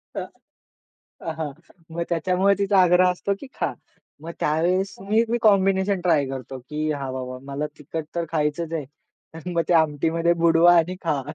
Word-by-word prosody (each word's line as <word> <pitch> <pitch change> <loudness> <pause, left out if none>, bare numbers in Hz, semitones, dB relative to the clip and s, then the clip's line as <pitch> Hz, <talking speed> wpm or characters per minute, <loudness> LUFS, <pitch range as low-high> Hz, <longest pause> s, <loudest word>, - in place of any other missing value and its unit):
त - - -2 1.0
अहा, 160 -2 -4 0.4
मग 170 +1 -4
त्याच्यामुळे 185 +3 +2
तिचा 200 -1 +3
आग्रह 180 0 +5
असतो, 190 +2 -2
की 280 - -8
खा. - - 0 0.5
मग 165 - -6
त्यावेळेस 180 +6 +1
मी 220 +2 +4
मी 240 - +1
कॉम्बिनेशन 195 -2 +3
ट्राय 165 -5 +2
करतो, 135 0 -6
की 150 +4 -3
हा 140 -3 -3
बाबा 130 -1 -5
मला 150 +2 -2
तिखट 155 +1 -5
तर 170 -1 -1
खायचंच 160 +1 -1
आहे. 155 -4 -3 0.5
तर 165 +3 -7
मग 170 -1 +1
ते - - +4
आमटीमध्ये 165 +2 +2
बुडवा 170 +1 +6
आणि 175 +2 +1
खा. 150 -5 0
165 Hz, 165 wpm, -23 LUFS, 150-185 Hz, 1.0 s, बुडवा